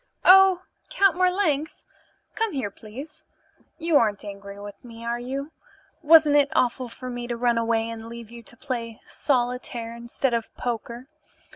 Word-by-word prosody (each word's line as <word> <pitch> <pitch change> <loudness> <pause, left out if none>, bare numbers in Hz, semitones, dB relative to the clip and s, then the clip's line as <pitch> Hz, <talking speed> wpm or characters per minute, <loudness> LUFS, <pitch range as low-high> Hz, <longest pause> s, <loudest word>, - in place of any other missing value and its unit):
Oh, 380 -1 +7 0.3
Count 395 -1 +3
Marlanx! 360 -5 0 0.5
Come 445 -1 -1
here, 250 -8 -2
please. 265 +10 -11 0.5
You 330 -2 +3
aren't 210 -4 +1
angry 200 0 -9
with 205 0 -10
me, 230 -1 -11
are 235 +1 -1
you? 275 +5 -5 0.5
Wasn't 310 -2 +6
it 285 -1 +5
awful 250 +1 +1
for 255 +2 -9
me 245 0 -5
to 240 -1 -3
run 240 -1 +2
away 225 -1 +1
and 230 -1 -6
leave 235 -1 -9
you 235 0 -10
to 235 +1 -14
play 230 -5 -5
solitaire 245 -3 -1
instead 235 +2 -2
of 230 -1 -2
poker? 240 +1 -4
245 Hz, 155 wpm, -25 LUFS, 230-290 Hz, 0.5 s, Oh